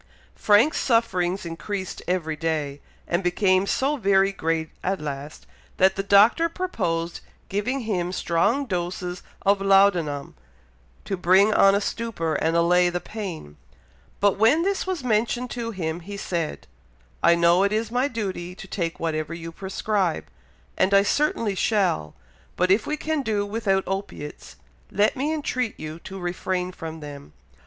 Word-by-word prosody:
'" -, -, -31 dB
Frank's 215 Hz, +9 st, +4 dB
sufferings 190 Hz, -7 st, +1 dB
increased 185 Hz, +3 st, -5 dB
every 170 Hz, -3 st, -1 dB
day, 150 Hz, -3 st, -2 dB, 0.3 s
and 170 Hz, +3 st, 0 dB
became 185 Hz, +2 st, +2 dB
so 280 Hz, +7 st, +1 dB
very 195 Hz, -3 st, +3 dB
great 165 Hz, -4 st, -2 dB
at 190 Hz, +1 st, -1 dB
last, 145 Hz, 0 st, -6 dB, 0.3 s
that 190 Hz, +1 st, +4 dB
the 195 Hz, -, -1 dB
Doctor 205 Hz, +12 st, +5 dB
proposed 175 Hz, -, -2 dB, 0.3 s
giving 240 Hz, +7 st, -1 dB
him 180 Hz, -6 st, -2 dB
strong 200 Hz, +10 st, +1 dB
doses 180 Hz, -2 st, -3 dB, 0.2 s
of 200 Hz, 0 st, +3 dB
laudanum, 185 Hz, -, +3 dB, 0.7 s
to 195 Hz, -, -2 dB
bring 190 Hz, +4 st, +4 dB
on 195 Hz, -1 st, +6 dB
a -, -, +3 dB
stupor 205 Hz, -7 st, -2 dB
and 160 Hz, +2 st, +1 dB
allay 175 Hz, +1 st, +4 dB
the 175 Hz, 0 st, -2 dB
pain; 175 Hz, -, -7 dB, 0.6 s
but 200 Hz, -1 st, +2 dB
when 255 Hz, +10 st, +4 dB
this 390 Hz, 0 st, -1 dB
was 365 Hz, -7 st, -2 dB
mentioned 240 Hz, +2 st, 0 dB
to 235 Hz, -1 st, -3 dB
him, 170 Hz, -6 st, -3 dB
he 200 Hz, +4 st, -8 dB
said, 170 Hz, -5 st, -3 dB, 0.6 s
"I 170 Hz, -, +5 dB
know 170 Hz, +2 st, +4 dB
it 200 Hz, 0 st, +2 dB
is 220 Hz, +1 st, -1 dB
my 250 Hz, +3 st, +1 dB
duty 190 Hz, -7 st, -4 dB
to 195 Hz, -, -10 dB
take 170 Hz, -3 st, -3 dB
whatever 160 Hz, 0 st, -2 dB
you 165 Hz, 0 st, -7 dB
prescribe, 190 Hz, 0 st, -1 dB, 0.5 s
and 190 Hz, +1 st, +4 dB
I 200 Hz, -, +6 dB
certainly 230 Hz, -3 st, +1 dB
shall, 185 Hz, -, 0 dB, 0.4 s
but 180 Hz, +1 st, +2 dB
if 205 Hz, +3 st, +3 dB
we 305 Hz, -, -1 dB
can 310 Hz, -1 st, -1 dB
do 210 Hz, -5 st, -1 dB
without 200 Hz, -2 st, 0 dB
opiates, 195 Hz, -6 st, -6 dB, 0.3 s
let 205 Hz, +2 st, +2 dB
me 285 Hz, +4 st, -1 dB
entreat 255 Hz, -7 st, -2 dB
you 155 Hz, +1 st, -6 dB
to 195 Hz, -, -7 dB
refrain 180 Hz, 0 st, -2 dB
from 160 Hz, -3 st, -8 dB
them. 145 Hz, -1 st, -10 dB
190 Hz, 155 wpm, -24 LUFS, 170-215 Hz, 0.7 s, on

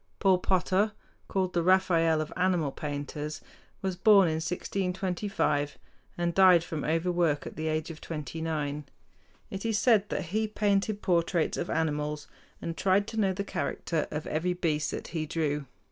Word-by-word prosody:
Paul 190 Hz, -3 st, +4 dB
Potter, 190 Hz, +3 st, +1 dB, 0.3 s
called 185 Hz, -2 st, -1 dB
the 175 Hz, -, +2 dB
"Raphael 165 Hz, -3 st, +3 dB
of 155 Hz, -, -5 dB
animal 180 Hz, -6 st, +1 dB
painters," 145 Hz, +1 st, -5 dB, 0.4 s
was 190 Hz, -1 st, -1 dB
born 200 Hz, 0 st, +6 dB
in 160 Hz, -1 st, 0 dB
1625, 180 Hz, -3 st, -1 dB, 0.4 s
and 175 Hz, 0 st, 0 dB
died 185 Hz, -3 st, +6 dB
from 160 Hz, -4 st, -4 dB
overwork 165 Hz, -2 st, +1 dB
at -, -, -7 dB
the 160 Hz, 0 st, -3 dB
age 155 Hz, +1 st, -1 dB
of 160 Hz, -, -11 dB
twenty 155 Hz, 0 st, -5 dB
nine. 150 Hz, -2 st, -2 dB, 0.7 s
It 195 Hz, -, -5 dB
is 225 Hz, -2 st, +1 dB
said 210 Hz, -2 st, +3 dB
that -, -, -2 dB
he 220 Hz, 0 st, +1 dB
painted 205 Hz, 0 st, 0 dB
portraits 170 Hz, -2 st, +1 dB
of 170 Hz, -, -3 dB
animals, 150 Hz, -1 st, -1 dB, 0.3 s
and 165 Hz, -, -4 dB
tried 195 Hz, +3 st, +2 dB
to 225 Hz, -, -7 dB
know 195 Hz, -3 st, +2 dB
the 200 Hz, +2 st, -3 dB
character 165 Hz, -5 st, -2 dB
of 150 Hz, 0 st, -4 dB
every 175 Hz, +4 st, 0 dB
beast 155 Hz, -4 st, 0 dB
that -, -, -5 dB
he 160 Hz, -2 st, -3 dB
drew. 150 Hz, -3 st, -1 dB
170 Hz, 160 wpm, -29 LUFS, 155-190 Hz, 0.7 s, born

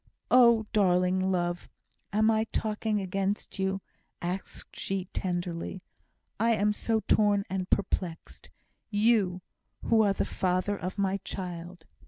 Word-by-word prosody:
Oh, 235 Hz, -3 st, +6 dB
darling 185 Hz, -1 st, +3 dB
love! 175 Hz, -1 st, -1 dB, 0.4 s
am 215 Hz, +2 st, +3 dB
I 220 Hz, 0 st, +2 dB
talking 215 Hz, -1 st, -1 dB
against 195 Hz, +1 st, -2 dB
you?" 190 Hz, 0 st, 0 dB, 0.4 s
asked 180 Hz, +2 st, -5 dB
she, 195 Hz, -1 st, -2 dB
tenderly. 175 Hz, 0 st, -3 dB, 0.6 s
"I 230 Hz, +1 st, +3 dB
am 210 Hz, 0 st, +2 dB
so 220 Hz, +1 st, 0 dB
torn 205 Hz, -2 st, +3 dB
and 185 Hz, -1 st, -2 dB
perplexed! 180 Hz, -4 st, -2 dB, 0.4 s
You, 205 Hz, -4 st, +2 dB, 0.4 s
who 225 Hz, -1 st, +4 dB
are 205 Hz, -2 st, +3 dB
the -, -, -1 dB
father 185 Hz, +2 st, 0 dB
of 185 Hz, +1 st, -5 dB
my 195 Hz, -1 st, +1 dB
child!" 175 Hz, -3 st, -7 dB
195 Hz, 125 wpm, -29 LUFS, 180-210 Hz, 0.6 s, Oh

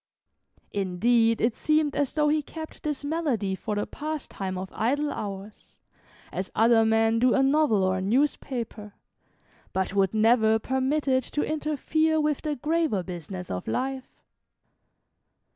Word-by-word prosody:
Indeed 225 Hz, +4 st, +2 dB
it 230 Hz, 0 st, +1 dB
seemed 305 Hz, -2 st, +1 dB
as 285 Hz, -3 st, 0 dB
though 300 Hz, -1 st, +3 dB
he 305 Hz, +1 st, +2 dB
kept 315 Hz, +2 st, -9 dB
this 295 Hz, -2 st, -3 dB
malady 285 Hz, -11 st, -1 dB
for 210 Hz, +2 st, -3 dB
the 205 Hz, -, -1 dB
pastime 290 Hz, -11 st, -5 dB
of 185 Hz, +1 st, -6 dB
idle 285 Hz, +6 st, 0 dB
hours, 200 Hz, 0 st, -7 dB, 0.5 s
as 190 Hz, -, -4 dB
other 225 Hz, 0 st, +5 dB
men 225 Hz, 0 st, +3 dB
do 250 Hz, +1 st, +4 dB
a 270 Hz, -, +3 dB
novel 270 Hz, -7 st, +3 dB
or 185 Hz, 0 st, +1 dB
a -, -, -3 dB
newspaper, 230 Hz, -2 st, -1 dB, 0.8 s
but 190 Hz, 0 st, -1 dB
would 195 Hz, 0 st, +1 dB
never 220 Hz, 0 st, +4 dB
permit 265 Hz, +5 st, -1 dB
it 260 Hz, -1 st, +3 dB
to 295 Hz, -, -2 dB
interfere 310 Hz, +1 st, 0 dB
with 300 Hz, -2 st, 0 dB
the 300 Hz, -2 st, -2 dB
graver 305 Hz, -, 0 dB
business 180 Hz, 0 st, -7 dB
of 90 Hz, -, -4 dB
life. 260 Hz, -, -4 dB
240 Hz, 145 wpm, -26 LUFS, 205-295 Hz, 0.8 s, other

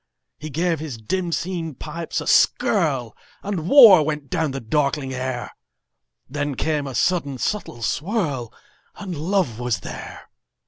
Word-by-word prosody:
He 155 Hz, -, -6 dB
gave 165 Hz, +2 st, 0 dB
his 150 Hz, -6 st, -6 dB
dim 175 Hz, -, -2 dB
seen 165 Hz, -3 st, -3 dB
pipes 165 Hz, +4 st, -5 dB
a -, -, -4 dB
skirlAnd 160 Hz, -, +1 dB
war 225 Hz, -, +9 dB
went 150 Hz, -2 st, -3 dB
down 160 Hz, -, 0 dB
the 135 Hz, 0 st, -4 dB
darkling 140 Hz, +2 st, -1 dB
air; 130 Hz, -1 st, -4 dB, 0.8 s
Then 145 Hz, +1 st, -3 dB
came 150 Hz, 0 st, -1 dB
a 135 Hz, -, -6 dB
sudden 145 Hz, -1 st, 0 dB
subtle 125 Hz, -, -3 dB
swirl, 145 Hz, -, -1 dB, 0.4 s
And 190 Hz, -4 st, -6 dB
love 160 Hz, -, -1 dB
was 120 Hz, -3 st, -1 dB
there. -, -, -8 dB
150 Hz, 135 wpm, -22 LUFS, 130-175 Hz, 0.8 s, war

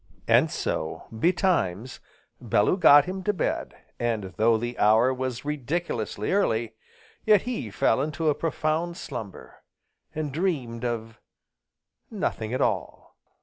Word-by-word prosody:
And -, -, +4 dB
so, 80 Hz, -, -3 dB
betimes, 130 Hz, -, 0 dB, 0.4 s
Bellew 105 Hz, -, +2 dB
got 145 Hz, -6 st, +7 dB
him 190 Hz, +1 st, -4 dB
to 210 Hz, -, +1 dB
bed, 185 Hz, -, -2 dB, 0.2 s
and, 110 Hz, -6 st, -2 dB
though 115 Hz, +1 st, +3 dB
the 120 Hz, +2 st, -5 dB
hour 110 Hz, +5 st, +4 dB
was 130 Hz, 0 st, -4 dB
ridiculously 145 Hz, -7 st, -3 dB
early, 115 Hz, -, +1 dB, 0.5 s
yet 210 Hz, -3 st, +4 dB
he 235 Hz, -, -4 dB
fell 110 Hz, +4 st, +1 dB
into 155 Hz, +2 st, -2 dB
a 150 Hz, -, +4 dB
profound 165 Hz, +2 st, -2 dB
slumber, 115 Hz, -, -8 dB, 0.5 s
and 155 Hz, -2 st, -3 dB
dreamed 135 Hz, -9 st, -2 dB
of 115 Hz, -2 st, -4 dB, 0.9 s
nothing 110 Hz, 0 st, -3 dB
at 130 Hz, -, -1 dB
all. -, -, -2 dB
130 Hz, 125 wpm, -26 LUFS, 110-165 Hz, 0.9 s, got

